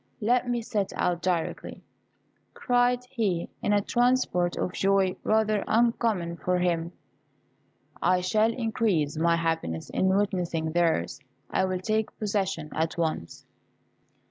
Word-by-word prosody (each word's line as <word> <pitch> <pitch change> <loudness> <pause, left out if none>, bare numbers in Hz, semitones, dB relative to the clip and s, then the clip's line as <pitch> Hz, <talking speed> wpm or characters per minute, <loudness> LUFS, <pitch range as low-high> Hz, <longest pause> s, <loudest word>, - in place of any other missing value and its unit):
Let 245 +3 +1
me 240 -1 -1
set 205 -3 -2
out 175 -1 0
directly," 175 -2 -2 0.7
cried 245 0 +1
he, 205 -9 -1
in - - 0
a 205 0 +3
transport 240 -9 +1
of 180 - -2
joy 195 -1 +2
rather 215 -1 +2
uncommon 220 -7 +1
for 180 +1 0
him; 170 -2 0 1.1
"I 180 0 +3
shall 215 +5 +2
increase 220 - 0
my 170 +2 +2
happiness 165 - -2
in 190 - +1
witnessing 180 -5 0
theirs: 165 - +1 0.3
I 190 - +2
will 185 -1 -2
take 215 +2 -1
possession 195 -7 -2
at 160 +1 -1
once." 160 - -3
190 Hz, 125 wpm, -27 LUFS, 170-220 Hz, 1.1 s, a